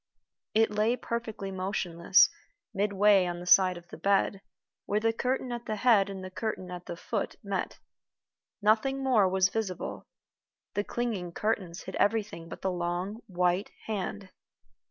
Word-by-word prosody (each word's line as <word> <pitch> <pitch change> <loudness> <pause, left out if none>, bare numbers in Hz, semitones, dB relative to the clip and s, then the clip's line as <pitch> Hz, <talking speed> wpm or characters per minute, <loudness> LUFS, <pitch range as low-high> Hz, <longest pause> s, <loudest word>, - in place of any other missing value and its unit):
It 220 -1 +4
lay 215 +3 +2
perfectly 225 -5 -4
motionless 185 -2 +3 0.5
midway 200 -1 +4
on 175 0 -3
the 175 - -8
side 185 0 +6
of 175 0 -14
the - - -10
bed, 200 0 +2 0.5
where 210 - +1
the 225 +1 +1
curtain 255 +2 -1
at 240 0 -5
the 215 - -1
head 210 -3 +4
and 190 -1 -6
the 185 - -7
curtain 185 -3 -4
at 180 -1 -8
the 175 - -4
foot - - -3
met. - - -3 0.9
Nothing 250 +6 +2
more 225 -8 +4
was 190 0 +3
visible. 200 -5 -4 0.7
The 205 - 0
clinging 210 -8 -3
curtains 190 -5 -2
hid - - -7
everything 205 -6 0
but - - -9
the 190 - +1
long 180 +5 -3
white 180 +1 +1 0.2
hand. 200 -2 -4
200 Hz, 155 wpm, -29 LUFS, 180-220 Hz, 0.9 s, side